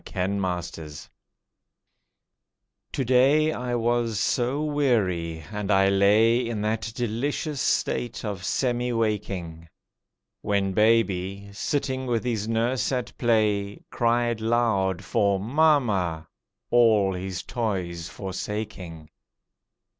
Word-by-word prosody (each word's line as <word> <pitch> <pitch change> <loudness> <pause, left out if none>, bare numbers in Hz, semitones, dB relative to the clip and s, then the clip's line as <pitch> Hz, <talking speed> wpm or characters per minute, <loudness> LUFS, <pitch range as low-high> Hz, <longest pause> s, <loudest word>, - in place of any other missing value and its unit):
INEVITABLE 90 -4 -2 2.0
To 135 - -1
day 135 +5 +4
I 125 -4 -3
was 120 -2 0
so 125 +6 0
weary 100 - 0
and 105 -1 -4
I 95 -1 +4
lay 105 +4 +4
In 110 -3 -3
that 110 +1 -2
delicious 135 +5 -2
state 120 -1 -1
of 100 -4 -4
semi 125 +3 0
waking, 95 -7 -3 0.7
When 100 -1 0
baby, 100 -2 +1
sitting 130 +3 -2
with 120 -2 0
his 110 -4 -2
nurse 115 +3 0
at 125 -2 -3
play, 105 -4 +1
Cried 120 -1 +1
loud 110 -6 +1
for 100 -2 +1
"mamma," 110 - +1 0.4
all 110 -5 +4
his 90 -1 -5
toys 90 -7 -3
forsaking. 95 -5 -6
110 Hz, 100 wpm, -25 LUFS, 95-120 Hz, 2.0 s, day